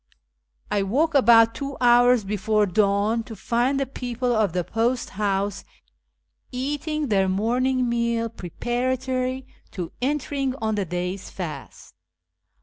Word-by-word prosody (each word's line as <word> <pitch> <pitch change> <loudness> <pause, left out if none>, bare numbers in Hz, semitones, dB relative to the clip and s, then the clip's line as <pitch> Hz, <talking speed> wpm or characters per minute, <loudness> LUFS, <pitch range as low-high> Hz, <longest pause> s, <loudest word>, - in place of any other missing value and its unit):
I 205 - +2
woke 280 +12 +1
about 230 -4 +6
two 275 +1 -5
hours 245 -1 +5
before 210 +1 +1
dawn 205 +3 +1
to 225 - -8
find 240 +6 0
the 275 - 0
people 245 -1 -2
of 215 -4 +2
the 180 +1 -1
post 235 +6 -1
house 200 0 -1 0.9
eating 290 +3 -2
their 195 -2 +2
morning 250 +6 +1
meal 235 -1 0
preparatory 255 +5 -2 0.2
to 180 -4 -6
enter 290 +2 -1
ing 270 -2 -1
on 220 -4 -2
the 205 -2 -1
day's 180 +2 -4
fast. 155 - -8
235 Hz, 130 wpm, -24 LUFS, 200-255 Hz, 0.9 s, about